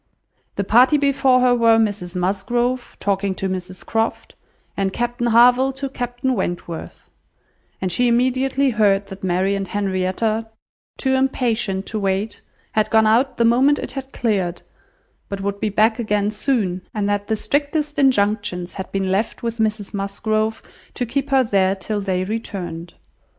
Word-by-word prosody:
The 200 Hz, -, -1 dB
party 245 Hz, +9 st, +5 dB
before 275 Hz, -3 st, +3 dB
her 250 Hz, -1 st, +4 dB
were, 230 Hz, -2 st, +4 dB
Mrs 205 Hz, -5 st, -1 dB
Musgrove, 240 Hz, +7 st, -1 dB
talking 195 Hz, -1 st, -1 dB
to 195 Hz, -, -2 dB
Mrs 185 Hz, 0 st, -5 dB
Croft, 225 Hz, 0 st, -2 dB, 0.4 s
and 195 Hz, -1 st, 0 dB
Captain 240 Hz, +2 st, -2 dB
Harville 245 Hz, +3 st, +5 dB
to 275 Hz, +1 st, -5 dB
Captain 250 Hz, 0 st, -2 dB
Wentworth; 175 Hz, -6 st, -5 dB, 0.7 s
and 185 Hz, -1 st, -2 dB
she 245 Hz, +8 st, +2 dB
immediately 260 Hz, +3 st, +2 dB
heard 205 Hz, -3 st, +2 dB
that 195 Hz, -1 st, -10 dB
Mary 185 Hz, +2 st, +1 dB
and 195 Hz, -1 st, -2 dB
Henrietta, 205 Hz, +3 st, -1 dB, 0.5 s
too 265 Hz, -1 st, 0 dB
impatient 240 Hz, -7 st, 0 dB
to 215 Hz, -, -3 dB
wait, 195 Hz, +2 st, -2 dB, 0.3 s
had 215 Hz, -1 st, +1 dB
gone 220 Hz, 0 st, +4 dB
out 235 Hz, +5 st, +2 dB
the 235 Hz, -, +3 dB
moment 260 Hz, +5 st, +4 dB
it -, -, -5 dB
had 270 Hz, -1 st, -7 dB
cleared, 195 Hz, -7 st, -1 dB, 0.7 s
but 200 Hz, -, -4 dB
would 200 Hz, 0 st, -3 dB
be 215 Hz, -, 0 dB
back 220 Hz, +3 st, +2 dB
again 210 Hz, -2 st, 0 dB
soon, 210 Hz, -6 st, -1 dB
and 205 Hz, -1 st, 0 dB
that 205 Hz, 0 st, -1 dB
the 220 Hz, -, +1 dB
strictest 295 Hz, +4 st, -1 dB
injunctions 205 Hz, -8 st, +1 dB
had 190 Hz, -, -7 dB
been 195 Hz, -1 st, -1 dB
left 205 Hz, +5 st, -1 dB
with 230 Hz, 0 st, -3 dB
Mrs 215 Hz, -2 st, -1 dB
Musgrove 215 Hz, +2 st, -1 dB, 0.3 s
to 245 Hz, -, -1 dB
keep 275 Hz, +4 st, -2 dB
her 270 Hz, -1 st, +4 dB
there 195 Hz, -4 st, +2 dB
till 205 Hz, +2 st, -3 dB
they 185 Hz, -2 st, -1 dB
returned. 185 Hz, -5 st, -5 dB
215 Hz, 155 wpm, -21 LUFS, 195-245 Hz, 0.7 s, party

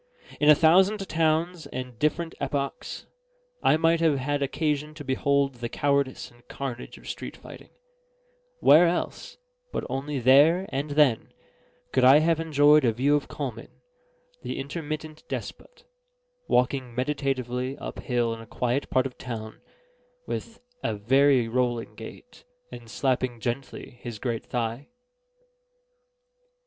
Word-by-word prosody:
In 150 Hz, -, +4 dB
a 150 Hz, -, +9 dB
thousand 190 Hz, +6 st, +4 dB
towns 165 Hz, +1 st, 0 dB
and 125 Hz, -2 st, -7 dB
different 165 Hz, +2 st, 0 dB
epochs 140 Hz, -, -3 dB, 0.6 s
I 155 Hz, -, +4 dB
might 165 Hz, +1 st, +3 dB
have 160 Hz, -4 st, +3 dB
had 145 Hz, +2 st, -1 dB
occasion 150 Hz, +1 st, -1 dB
to 150 Hz, -, -8 dB
behold 140 Hz, +1 st, +1 dB
the 120 Hz, 0 st, -4 dB
cowardice 140 Hz, -2 st, 0 dB
and 120 Hz, 0 st, -22 dB
carnage 130 Hz, -3 st, -6 dB
of -, -, -14 dB
street -, -, -6 dB
fighting; -, -, -13 dB, 0.9 s
where 165 Hz, +4 st, +7 dB
else, 175 Hz, +1 st, -3 dB, 0.3 s
but -, -, -3 dB
only 140 Hz, +2 st, -3 dB
there 145 Hz, +9 st, +5 dB
and 140 Hz, +3 st, -3 dB
then, 145 Hz, -6 st, +2 dB, 0.6 s
could 130 Hz, -, +2 dB
I 130 Hz, +3 st, +8 dB
have 160 Hz, +1 st, +2 dB
enjoyed 150 Hz, -2 st, +5 dB
a 120 Hz, -, +3 dB
view 135 Hz, +6 st, +2 dB
of 145 Hz, -, -1 dB
Coleman -, -, -6 dB, 0.7 s
(the -, -, -5 dB
intermittent 155 Hz, +2 st, -5 dB
despot) -, -, -7 dB, 0.6 s
walking 125 Hz, -1 st, +1 dB
meditatively 130 Hz, -1 st, -2 dB
up -, -, -7 dB
hill 120 Hz, -2 st, 0 dB
in 115 Hz, -, -8 dB
a 115 Hz, -, -12 dB
quiet 125 Hz, +5 st, -1 dB
part 130 Hz, 0 st, +2 dB
of 130 Hz, -, -7 dB
town, 110 Hz, -3 st, -7 dB, 0.6 s
with 230 Hz, -, -6 dB, 0.2 s
a 110 Hz, -, -1 dB
very 130 Hz, +3 st, +3 dB
rolling 120 Hz, -1 st, -1 dB
gait, -, -, -12 dB, 0.3 s
and 120 Hz, -1 st, -10 dB
slapping 125 Hz, -1 st, -1 dB
gently 120 Hz, 0 st, -5 dB
his 120 Hz, -3 st, -6 dB
great 115 Hz, 0 st, -4 dB
thigh? 120 Hz, +2 st, -3 dB
140 Hz, 135 wpm, -26 LUFS, 125-155 Hz, 0.9 s, a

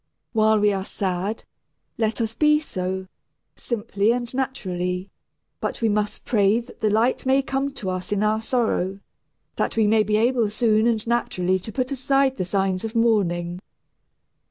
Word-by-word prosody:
While 220 Hz, -1 st, +4 dB
we 205 Hz, 0 st, +3 dB
are 190 Hz, -1 st, -2 dB
sad, 190 Hz, +2 st, -3 dB, 0.6 s
let 220 Hz, +1 st, 0 dB
us 225 Hz, -1 st, -1 dB
be 300 Hz, +4 st, +4 dB
so, 190 Hz, -9 st, -4 dB, 0.5 s
simply 215 Hz, -2 st, 0 dB
and 240 Hz, 0 st, -2 dB
naturally; 185 Hz, -8 st, -2 dB, 0.5 s
but -, -, -3 dB
we 225 Hz, -, +2 dB
must 210 Hz, 0 st, -1 dB
pray 210 Hz, -1 st, +3 dB
that 240 Hz, +1 st, -12 dB
the 215 Hz, -, +3 dB
light 230 Hz, +5 st, +1 dB
may 270 Hz, +1 st, +4 dB
come 270 Hz, +1 st, -1 dB
to 205 Hz, -8 st, -3 dB
us 185 Hz, +3 st, -5 dB
in 205 Hz, 0 st, +1 dB
our 215 Hz, +1 st, +1 dB
sorrow, 220 Hz, -6 st, 0 dB, 0.6 s
that -, -, -1 dB
we 220 Hz, -, +4 dB
may 215 Hz, +1 st, +4 dB
be 210 Hz, 0 st, +1 dB
able 235 Hz, -1 st, +2 dB
soon 220 Hz, 0 st, +2 dB
and 225 Hz, -2 st, 0 dB
naturally 190 Hz, -6 st, 0 dB
to 205 Hz, +4 st, -7 dB
put 255 Hz, +3 st, -2 dB
aside 270 Hz, 0 st, +1 dB
the 185 Hz, -, -1 dB
signs 190 Hz, 0 st, 0 dB
of 225 Hz, +1 st, -5 dB
mourning. 180 Hz, -7 st, +1 dB
215 Hz, 165 wpm, -23 LUFS, 195-240 Hz, 0.6 s, While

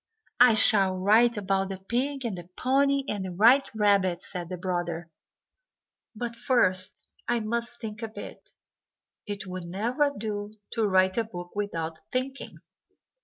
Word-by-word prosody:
"I 245 Hz, -2 st, +7 dB
shall 200 Hz, -3 st, +6 dB
write 220 Hz, +5 st, +4 dB
about 195 Hz, -1 st, 0 dB
the 195 Hz, -, -4 dB
pig, 255 Hz, +7 st, -2 dB
and 220 Hz, -5 st, -2 dB
the 175 Hz, 0 st, -10 dB
pony, 275 Hz, +2 st, +2 dB
and 205 Hz, -6 st, -2 dB
the 185 Hz, -, -5 dB
white 235 Hz, +9 st, +5 dB
rabbit," 200 Hz, -4 st, +2 dB
said 175 Hz, -3 st, -6 dB
the 180 Hz, -, -4 dB
brother; 175 Hz, -2 st, -3 dB, 1.0 s
"but 235 Hz, +1 st, -4 dB
first 185 Hz, -7 st, +1 dB, 0.3 s
I 240 Hz, 0 st, +1 dB
must 235 Hz, +2 st, -3 dB
think 215 Hz, -1 st, -7 dB
a 225 Hz, -, -3 dB
bit. 220 Hz, -, -10 dB, 0.8 s
It 205 Hz, -1 st, -5 dB
would 185 Hz, -1 st, -6 dB
never 235 Hz, -, 0 dB
do 205 Hz, -1 st, -4 dB, 0.2 s
to 225 Hz, -3 st, 0 dB
write 190 Hz, +2 st, +3 dB
a -, -, +2 dB
book 175 Hz, -5 st, -9 dB
without 165 Hz, -6 st, -3 dB
thinking." 265 Hz, +2 st, -4 dB
205 Hz, 150 wpm, -27 LUFS, 185-235 Hz, 1.0 s, I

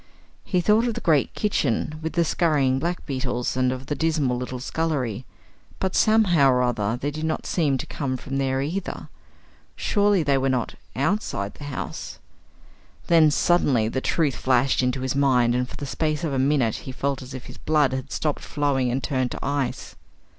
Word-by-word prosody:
He 180 Hz, -3 st, 0 dB
thought 215 Hz, +6 st, +3 dB
of 230 Hz, -, -2 dB
the -, -, -3 dB
great 155 Hz, -6 st, +2 dB
kitchen, 155 Hz, -, 0 dB
with 160 Hz, 0 st, -3 dB
the 170 Hz, -1 st, +2 dB
scurrying 145 Hz, -6 st, +2 dB
black 175 Hz, +4 st, -3 dB
beetles, 130 Hz, -3 st, -2 dB
and 130 Hz, 0 st, +2 dB
of 130 Hz, 0 st, -5 dB
the 150 Hz, -, -2 dB
dismal 150 Hz, -4 st, +1 dB
little 125 Hz, 0 st, -4 dB
scullery; 130 Hz, -5 st, -2 dB, 0.5 s
but, 190 Hz, -1 st, -2 dB
somehow 185 Hz, -10 st, +4 dB
or 125 Hz, -1 st, +3 dB
other, 115 Hz, -2 st, 0 dB
they 145 Hz, +2 st, -2 dB
did 155 Hz, +1 st, -6 dB
not 160 Hz, 0 st, -2 dB
seem 150 Hz, -6 st, +1 dB
to -, -, -5 dB
come 130 Hz, -3 st, -3 dB
from 135 Hz, +2 st, -4 dB
there 135 Hz, 0 st, 0 dB
either. 175 Hz, +6 st, -4 dB, 0.7 s
Surely 205 Hz, -4 st, +2 dB
they 140 Hz, -2 st, +2 dB
were 135 Hz, +1 st, +1 dB
not 125 Hz, -3 st, -1 dB, 0.2 s
outside 135 Hz, -, -1 dB
the 145 Hz, -, -10 dB
house! 145 Hz, -2 st, -6 dB, 0.9 s
Then, 160 Hz, -2 st, +6 dB
suddenly, 145 Hz, -8 st, +2 dB
the 130 Hz, +4 st, -2 dB
truth 150 Hz, -2 st, +1 dB
flashed 130 Hz, +1 st, +2 dB
into 125 Hz, +1 st, 0 dB
his 130 Hz, +1 st, -1 dB
mind, 125 Hz, -4 st, +3 dB
and 125 Hz, +1 st, -1 dB
for -, -, -9 dB
the 145 Hz, -, -5 dB
space 155 Hz, +3 st, -1 dB
of 155 Hz, -4 st, -1 dB
a 135 Hz, -, 0 dB
minute 135 Hz, -4 st, +2 dB
he 130 Hz, -, -7 dB
felt 135 Hz, +1 st, -2 dB
as 130 Hz, +1 st, -8 dB
if 130 Hz, -, -8 dB
his -, -, -11 dB
blood 150 Hz, -4 st, +2 dB
had 130 Hz, -1 st, -4 dB
stopped 150 Hz, -2 st, -1 dB
flowing 140 Hz, -4 st, 0 dB
and 130 Hz, +2 st, -2 dB
turned 130 Hz, -2 st, 0 dB
to -, -, -6 dB
ice. 140 Hz, -3 st, -2 dB
140 Hz, 190 wpm, -24 LUFS, 130-155 Hz, 0.9 s, Then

